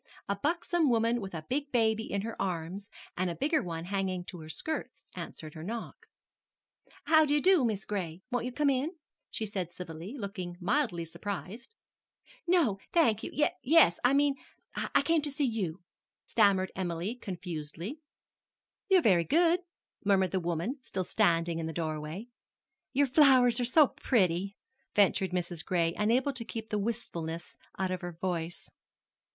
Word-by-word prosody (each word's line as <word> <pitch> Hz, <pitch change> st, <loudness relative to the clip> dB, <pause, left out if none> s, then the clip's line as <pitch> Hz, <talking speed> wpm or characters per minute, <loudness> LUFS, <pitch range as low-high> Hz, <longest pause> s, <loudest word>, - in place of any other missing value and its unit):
A 200 Hz, -, 0 dB
buxom 330 Hz, -, +1 dB
woman 230 Hz, 0 st, +2 dB
with 190 Hz, -3 st, -6 dB
a 155 Hz, -1 st, -6 dB
big 285 Hz, +2 st, -2 dB
baby 225 Hz, -2 st, +1 dB
in 200 Hz, -, 0 dB
her 225 Hz, +2 st, -5 dB
arms, 185 Hz, +2 st, -3 dB, 0.3 s
and 185 Hz, 0 st, 0 dB
a 170 Hz, -, -3 dB
bigger 305 Hz, -, +1 dB
one 165 Hz, -2 st, -5 dB
hanging 190 Hz, -1 st, -1 dB
to 180 Hz, -, -8 dB
her 155 Hz, 0 st, -10 dB
skirts, 315 Hz, -, -5 dB
answered 155 Hz, -1 st, -7 dB
her 155 Hz, -, -8 dB
knock. 225 Hz, +7 st, -6 dB, 1.0 s
"How 315 Hz, 0 st, +6 dB
do 295 Hz, -1 st, +2 dB
you -, -, +4 dB
do, 365 Hz, -2 st, +5 dB
Mis' 210 Hz, -5 st, -1 dB
Gray. 185 Hz, -3 st, -4 dB
Won't 245 Hz, -1 st, 0 dB
you 250 Hz, -, -3 dB
come 290 Hz, +2 st, +2 dB
in?" 280 Hz, +7 st, -1 dB, 0.4 s
said 200 Hz, -5 st, -3 dB
she -, -, -25 dB
civilly, 175 Hz, -, -7 dB
looking 190 Hz, -5 st, -5 dB
mildly 195 Hz, -, 0 dB
surprised. 205 Hz, -, -6 dB, 0.7 s
"No, 315 Hz, -, +3 dB
thank 230 Hz, -11 st, +3 dB
you -, -, -5 dB, 0.3 s
yes 285 Hz, -, +5 dB
I 250 Hz, +3 st, +5 dB
mean 285 Hz, 0 st, +4 dB, 0.4 s
I -, -, +1 dB
came 330 Hz, -1 st, +3 dB
to 295 Hz, -, -3 dB
see 285 Hz, +1 st, 0 dB
you," 190 Hz, -8 st, -2 dB, 0.4 s
stammered 200 Hz, -4 st, +3 dB
Emily 175 Hz, +2 st, -2 dB
confusedly. 180 Hz, -, -6 dB, 0.9 s
"You're 375 Hz, -3 st, +5 dB
very 180 Hz, -6 st, +5 dB
good," 335 Hz, -, +3 dB, 0.4 s
murmured 195 Hz, -3 st, +3 dB
the 190 Hz, -, +1 dB
woman, 175 Hz, -, -2 dB
still 190 Hz, -7 st, -3 dB
standing 170 Hz, -4 st, +2 dB
in 160 Hz, -, -3 dB
the 160 Hz, -, -4 dB
doorway. 155 Hz, +5 st, -4 dB, 0.6 s
"Your 285 Hz, +2 st, +3 dB
flowers 255 Hz, -3 st, +5 dB
are 245 Hz, -, +1 dB
so 295 Hz, +5 st, +6 dB
pretty," 195 Hz, -, +1 dB, 0.4 s
ventured 195 Hz, -2 st, +4 dB
Mrs. 175 Hz, -2 st, -2 dB
Gray, 170 Hz, -2 st, +1 dB
unable 245 Hz, +6 st, +2 dB
to 255 Hz, -3 st, -4 dB
keep 225 Hz, -1 st, -6 dB
the 210 Hz, -, +1 dB
wistfulness 170 Hz, -7 st, -4 dB, 0.2 s
out 190 Hz, -1 st, -1 dB
of 185 Hz, -, -3 dB
her 175 Hz, -1 st, -5 dB
voice. 170 Hz, -1 st, -3 dB
200 Hz, 160 wpm, -30 LUFS, 175-255 Hz, 1.0 s, How